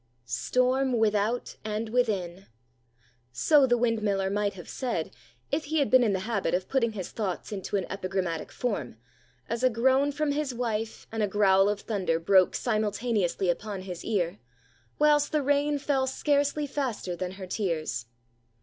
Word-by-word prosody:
STORM 255 Hz, -, +1 dB
without 220 Hz, +2 st, 0 dB
and 215 Hz, +1 st, -3 dB
within! 195 Hz, -7 st, -1 dB, 0.8 s
So 270 Hz, -, +4 dB
the 245 Hz, -1 st, +3 dB
windmiller 210 Hz, -5 st, +1 dB
might 205 Hz, 0 st, 0 dB
have 175 Hz, -, -10 dB
said, 255 Hz, -2 st, -3 dB, 0.4 s
if 305 Hz, +2 st, 0 dB
he 315 Hz, +2 st, -1 dB
had 285 Hz, -3 st, +2 dB
been 255 Hz, -1 st, +7 dB
in 215 Hz, -4 st, +2 dB
the 190 Hz, -, -1 dB
habit 200 Hz, -6 st, 0 dB
of 185 Hz, +1 st, -2 dB
putting 235 Hz, -4 st, +1 dB
his 190 Hz, -4 st, -5 dB
thoughts 200 Hz, -4 st, -4 dB
into 200 Hz, 0 st, -4 dB
an 190 Hz, -, -2 dB
epigrammatic 185 Hz, -4 st, -3 dB
form, 200 Hz, -, -3 dB, 0.5 s
as 230 Hz, +1 st, -3 dB
a 255 Hz, -, +5 dB
groan 265 Hz, +4 st, +3 dB
from 295 Hz, 0 st, -1 dB
his 285 Hz, -3 st, -2 dB
wife 225 Hz, -2 st, -3 dB
and 225 Hz, 0 st, -2 dB
a 210 Hz, -, +2 dB
growl 195 Hz, -1 st, +4 dB
of 205 Hz, -1 st, -2 dB
thunder 190 Hz, -7 st, -1 dB
broke 185 Hz, +2 st, +4 dB
simultaneously 215 Hz, -4 st, 0 dB
upon 190 Hz, +2 st, -2 dB
his 180 Hz, -2 st, -7 dB
ear, 190 Hz, -3 st, -1 dB, 0.6 s
whilst 295 Hz, -1 st, +4 dB
the 300 Hz, -2 st, +1 dB
rain 285 Hz, +1 st, +2 dB
fell 270 Hz, -2 st, 0 dB
scarcely 285 Hz, +2 st, +1 dB
faster 255 Hz, -10 st, -3 dB
than 180 Hz, +1 st, -4 dB
her 190 Hz, 0 st, -8 dB
tears. 165 Hz, -, -2 dB
215 Hz, 160 wpm, -28 LUFS, 190-260 Hz, 0.8 s, been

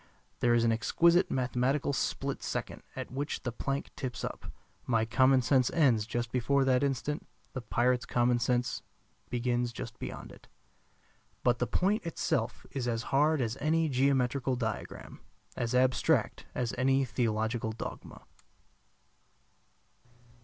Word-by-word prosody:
There 120 Hz, -1 st, +3 dB
is 115 Hz, -, +3 dB
an 115 Hz, -, +3 dB
exquisite 170 Hz, -, +3 dB
mathematical 130 Hz, +3 st, 0 dB
split 130 Hz, -, -2 dB
second -, -, -4 dB
at -, -, -6 dB
which 140 Hz, +3 st, -3 dB
the 125 Hz, -, -2 dB
plank 140 Hz, +4 st, -3 dB
tips 125 Hz, -3 st, -5 dB
up. -, -, -6 dB, 0.4 s
My 115 Hz, -2 st, +2 dB
common 130 Hz, +2 st, +4 dB
sense 130 Hz, 0 st, +3 dB
ends 120 Hz, -10 st, +3 dB
just 120 Hz, 0 st, -2 dB
before 135 Hz, +2 st, +2 dB
that 130 Hz, -1 st, +3 dB
instant; 140 Hz, +2 st, -2 dB, 0.3 s
the 130 Hz, -, -4 dB
pirate's 125 Hz, +1 st, +1 dB
common 120 Hz, 0 st, +2 dB
sense 125 Hz, 0 st, 0 dB, 0.5 s
begins 120 Hz, 0 st, 0 dB
just 115 Hz, -1 st, -8 dB
beyond -, -, -7 dB
it. -, -, -16 dB, 1.0 s
But 120 Hz, -1 st, +3 dB
the 125 Hz, -, 0 dB
point 205 Hz, +4 st, +1 dB
itself 165 Hz, -, -2 dB
is 130 Hz, -3 st, -3 dB
as 115 Hz, -1 st, -1 dB
hard 150 Hz, +1 st, +4 dB
as 115 Hz, +1 st, -2 dB
any 160 Hz, +1 st, +2 dB
geometrical 130 Hz, 0 st, +1 dB
diagram; 115 Hz, -3 st, -5 dB, 0.4 s
as 120 Hz, +1 st, -1 dB
abstract 130 Hz, 0 st, +2 dB
as 120 Hz, -2 st, -1 dB
any 135 Hz, +1 st, +3 dB
theological 110 Hz, -2 st, -1 dB
dogma. 110 Hz, -, -8 dB
125 Hz, 135 wpm, -30 LUFS, 120-135 Hz, 1.0 s, common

